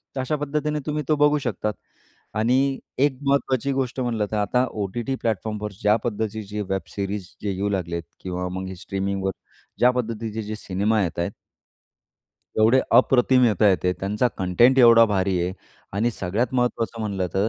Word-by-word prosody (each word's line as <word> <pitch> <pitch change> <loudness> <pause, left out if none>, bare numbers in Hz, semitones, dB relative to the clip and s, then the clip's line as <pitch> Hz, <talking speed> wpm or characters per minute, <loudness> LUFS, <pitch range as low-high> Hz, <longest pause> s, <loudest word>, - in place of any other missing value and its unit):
तर 130 - -1
अशा 150 +4 -1
पद्धतीने 150 +1 -1
तुम्ही 150 0 -1
तो 155 - +4
बघू 150 +1 +4
शकतात. 105 0 -2 0.6
आणि 130 +5 +2 0.2
एक 135 0 +2
महत्त्वाची 140 -1 +1
गोष्ट 130 -1 -2
म्हटलं 115 -4 0
तर 110 - -1
आता 125 +5 +2 0.2
ओ-टी-टी 120 +7 -3
प्लॅटफॉर्मवर 105 -1 -2
ज्या 105 +1 +4
पद्धतीचे 105 -2 -3
वेब 95 0 0
सीरीज 100 -1 -3
जे 105 - -1
येऊ 100 +2 -1
लागले 90 -4 -2
आहेत 85 -3 -6
किंवा 90 0 -3
मग 95 +1 -4
हे 95 - -6
स्ट्रीमिंगवर 95 +1 -2 0.5
ज्या 125 - +6
पद्धतीचे 115 -3 -3
जे 110 +1 -5
सिनेमा 105 +2 0
येत 85 - -3
आहेत 85 - -2 1.3
एवढे 115 +4 +5 0.2
अप्रतिम 125 0 +4
येतायेत 105 -4 +4
ते 90 - +2
त्यांचा 105 +5 +1
कंटेंट 120 +8 +4
एवढा 115 -2 +8
भारी 95 -3 +1
आहे. 90 +1 -1 0.4
आणि 110 +5 +1
सगळ्यात 110 +5 -2
महत्त्वाचं 120 -2 0
म्हटलं 100 -4 -1
तर 100 +3 +2
110 Hz, 165 wpm, -23 LUFS, 95-125 Hz, 1.3 s, एवढा